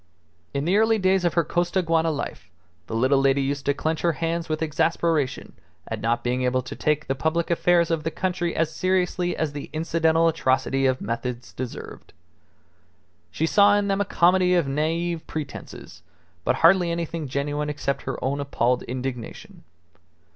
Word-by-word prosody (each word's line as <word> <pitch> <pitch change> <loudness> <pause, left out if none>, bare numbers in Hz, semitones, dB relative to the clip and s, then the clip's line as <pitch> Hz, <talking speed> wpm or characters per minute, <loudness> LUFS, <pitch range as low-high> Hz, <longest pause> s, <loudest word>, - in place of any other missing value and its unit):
In 140 +1 -2
the 185 +4 +3
early 220 +1 +4
days 190 -2 +2
of 175 - +1
her 170 - +4
Costaguana 165 -1 +1
life, 145 - -5 0.4
the 110 - -4
little 130 +4 +3
lady 135 0 +3
used 140 0 -3
to 140 - +4
clench 160 +2 -2
her 170 -1 +2
hands 165 +1 -2
with 155 +1 -1
exasperation 160 -2 0 0.3
at - - -4
not 115 +1 0
being 125 +1 0
able 125 0 +1
to 125 - -7
take 150 0 0
the 135 - 0
public 160 +5 -1
affairs 170 0 +3
of 160 -2 0
the 160 - -1
country 175 0 -2
as 160 -1 0
seriously 180 -1 0
as 155 -2 -1
the 145 - -7
incidental 165 +1 +2
atrocity 135 -4 +1
of 130 0 0
methods 120 +2 -4
deserved. 130 -1 -8 1.2
She 150 - -1
saw 205 +4 +5
in 205 -1 0
them 195 0 +1
a - - +1
comedy 180 +1 +3
of 170 -5 +2
naive 165 +4 -1
pretences, 150 - -7 0.4
but - - +1
hardly 175 0 +5
anything 170 -2 -3
genuine 145 +2 -2
except 140 -2 -2
her - - -4
own 140 +2 -1
appalled 125 -3 0
indignation. 125 -2 -6
160 Hz, 170 wpm, -24 LUFS, 135-170 Hz, 1.2 s, saw